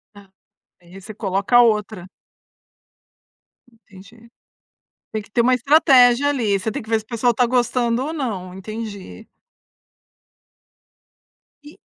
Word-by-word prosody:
A, 200 -1 -17 0.5
aí 175 +2 -15
você 215 +3 -10
coloca 200 +3 +1
outra. 215 -5 0 1.7
Entendi. 225 +1 -19 0.8
Tem 220 - -3
que 205 - -21
ter 235 - 0
uma 255 +2 +3
estratégia 260 -1 +4
ali, 230 -8 0
você 210 +3 -4
tem - - -5
que 220 - -16
ver 225 0 +1
se 220 - -11
o - - -46
pessoal 240 0 0
está 245 +2 +1
gostando 240 0 0
ou 315 - -5
não, 200 - -5
entendi. 215 +1 -9 2.4
E 295 +1 -15
225 Hz, 125 wpm, -20 LUFS, 200-245 Hz, 2.4 s, estratégia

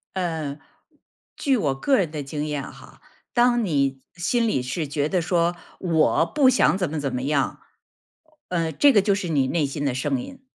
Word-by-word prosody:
嗯 160 -6 -3 0.8
据 270 -4 +1
我 140 -9 0
个 265 - +2
人 180 -6 +1
的 150 -2 -5
经 150 +2 -4
验 145 -2 -3
哈， - - -16 0.3
当 240 -1 +3
你 140 -6 0
心 230 +7 +1
里 135 -11 +1
是 150 +4 -3
觉 145 +1 -1
得 180 -2 +1
说 175 0 +1 0.2
我 165 -2 +2
不 275 - +3
想 250 -6 +3
怎 185 -5 -1
么 155 - -4
怎 135 -2 -3
么 125 0 -2
样 140 -1 0 0.9
嗯， 165 -3 -1
这 285 -2 +6
个 205 - +5
就 200 +1 +2
是 195 -2 -2
你 140 -4 +2
内 160 -1 +1
心 145 +1 -4
的 135 -3 0
声 250 - -1
音。 270 0 -11
165 Hz, 205 characters per minute, -24 LUFS, 145-205 Hz, 0.9 s, 这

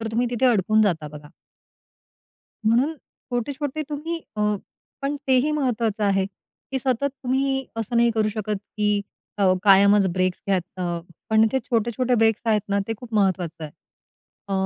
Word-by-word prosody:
तर 225 - -4
तुम्ही 240 +2 +1
तिथे 245 +2 +2
अडकून 215 -1 +3
जाता 165 -7 0
बघा. 150 0 -11 1.4
म्हणून 245 +8 +3
छोटे-छोटे 280 +4 -5
तुम्ही 325 +3 -4 0.2
अ, - - -2 0.6
पण 285 +1 -1
तेही 260 +3 +4
महत्त्वाचं 230 -7 0
आहे, 195 -1 +2
की 210 +6 -9
सतत 260 +1 0
तुम्ही 265 +1 0
असं 225 +1 -2
नाही 235 0 +5
करू 215 -1 +2
शकत 210 -1 -2 0.2
की 210 -1 +2 0.4
अ, 190 -2 +4
कायमच 200 0 +6
ब्रेक्स 185 0 0
घ्यात 185 -1 -2
अ, 175 -1 -1 0.3
पण 220 0 +5
ते 265 - +3
छोटे-छोटे 235 +2 +1
ब्रेक्स 225 -1 +2
आहेत 215 -2 +3
ना, 200 0 +1
ते - - 0
खूप 240 -3 -9
महत्त्वाचं 180 -5 0
आहे. 150 - -7 0.8
अ, - - -3
220 Hz, 155 wpm, -23 LUFS, 200-255 Hz, 1.4 s, कायमच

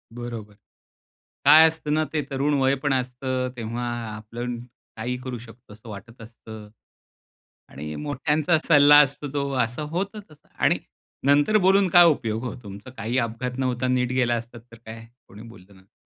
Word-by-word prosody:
बरोबर. 115 -3 -7 0.9
काय 160 +1 +9
असतं 160 -2 -4
ना 155 0 +1
ते 150 -2 0
तरुण 140 +2 0
वय 135 +1 +3
पण 145 -2 +1
असतं. 130 0 -2
तेव्हा 120 +1 -4 0.3
आपण 120 +3 -6 0.4
काही 120 +3 -3
करू 125 -2 -5
शकतो 115 -1 -15
असं 110 +2 -14
वाटत 110 +3 -11
असतं. 110 -1 -12 1.0
आणि 75 +2 -7
मोठ्यांचा 150 +3 0
सल्ला 145 -2 +7
असतो 140 +1 -7
जो 140 0 -2
असं 120 +6 -5
होतं 195 +5 -3
तसं 155 -1 -21
आणि - - +2 0.5
नंतर 145 +9 +4
बोलून 195 0 +4
काय 175 0 +7
उपयोग 115 -7 0
हो. 125 - -4
तुमचा 100 +4 -10
काही 120 0 -3
अपघात 125 +2 -3
न 135 - -1
होता 130 0 -1
नीट 125 0 0
गेला 125 -2 +1
असतात 120 0 -6
तर - - -11
काय 115 0 -9 0.2
कोणी 105 +2 -13
बोललं 100 -3 -16
नसंत. 95 +1 -25
125 Hz, 165 wpm, -24 LUFS, 115-145 Hz, 1.0 s, काय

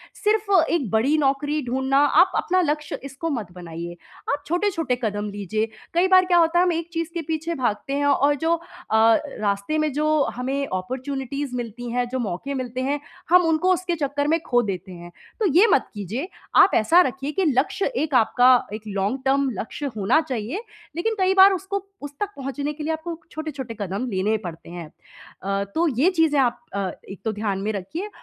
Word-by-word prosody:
सिर्फ़ 425 -1 0 0.2
एक 290 -10 0
बड़ी 270 +8 +3
नौकरी 290 +1 +1
ढूँढना, 265 +2 +1
आप 325 +6 +5
अपना 370 +1 +2
लक्ष्य 300 -2 -2
इसको 275 +4 -5
मत 225 - -3
बनाइए। 170 -1 -7 0.4
आप 285 0 -2
छोटे-छोटे 345 -6 0
कदम 205 -1 -2
लीजिए। 205 +2 -2 0.3
कई 350 +2 +3
बार 370 0 +6
क्या 355 -1 +3
होता 335 +1 +4
है, - - +5
हम 360 - +2
एक 330 +1 -3
चीज़ 330 0 -2
के 340 - -2
पीछे 320 +2 -3
भागते 245 0 -2
हैं 285 0 0
और 285 +1 +3
जो 325 +4 +1
अ, 335 - -10 0.8
रास्ते 200 +7 -1
में 310 -1 +1
जो 305 0 +2
हमें 270 +3 -2
अपॉर्च्युनिटीज़ 260 +6 -4
मिलती 240 0 -5
हैं, 245 0 0
जो 260 0 -2
मौके 220 +6 -3
मिलते 255 -1 -3
हैं, 285 +2 -1 0.3
हम 360 0 +6
उनको 355 +4 +3
उसके 355 -1 -1
चक्कर 285 -2 -3
में 330 - +3
खो 245 -1 +3
देते 190 -2 -4
हैं, 175 -1 -10 0.3
तो 435 - +1
ये 365 +7 +7
मत 270 - +2
कीजिए। 215 - -4 0.3
आप 390 - +7
ऐसा 325 +11 +5
रखिए 270 -2 -2
कि 380 +2 0
लक्ष्य 280 +7 +1
एक 305 -2 -1
आपका, 245 +1 +5
एक 215 - -5
लॉन्ग 200 +6 -1
टर्म 275 0 +2
लक्ष्य 285 +6 -5
होना 220 +10 +3
चाहिए, 250 - -3 0.3
लेकिन 445 +6 -1
कई 375 0 +3
बार 385 +1 +8
उसको 385 +1 -3 0.2
उस 290 0 -7
तक 415 - -1
पहुँचने 280 +2 -3
के 300 0 -7
लिए 320 +1 0
आपको 330 +1 -5
छोटे-छोटे 285 -7 -5
कदम 200 +6 -3
लेने 205 +3 +1
पड़ते 165 0 -8
हैं। 170 -2 -7 0.6
अ, 195 0 0
तो 335 +1 +3
ये 345 +6 +5
चीज़ें 320 -4 +2
आप 245 -2 +2 0.2
अ, 195 -2 -1 0.2
एक 195 - -8
तो 220 - +1
ध्यान 205 -2 -2
में 215 +2 -1
रखिए 320 - -5
275 Hz, 195 wpm, -23 LUFS, 220-325 Hz, 0.8 s, बार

